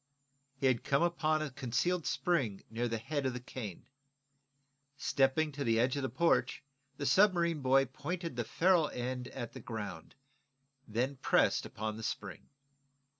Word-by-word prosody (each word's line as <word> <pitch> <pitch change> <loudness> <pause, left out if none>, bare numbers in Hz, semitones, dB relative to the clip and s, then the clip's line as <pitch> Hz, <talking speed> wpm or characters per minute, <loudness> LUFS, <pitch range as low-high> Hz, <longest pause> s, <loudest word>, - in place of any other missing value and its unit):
He 135 - -3
had 130 -3 +3
come 140 +4 +2
upon 155 -3 +1
a 150 - -4
concealed 140 +7 -1
spring 130 - 0
near 120 +2 -1
the 115 -1 -1
head 140 +4 -2
of 130 - -2
the 125 - -4
cane. 120 -6 -7 1.1
Stepping 140 +2 +2
to 140 0 -4
the 115 -2 +2
edge 125 +3 +2
of 140 - -1
the 130 - -1
porch, 165 +6 +1 0.3
the 145 - -3
submarine 170 0 +4
boy 135 +1 +4
pointed 165 +5 -5
the 120 - -1
ferrule 160 +6 +3
end 125 0 -4
at 120 -3 -6
the - - -8
ground, 105 -8 -6 0.7
then 125 +6 -1
pressed - - +2
upon 110 0 -4
the - - -7
spring. - - -5
135 Hz, 160 wpm, -33 LUFS, 120-155 Hz, 1.1 s, submarine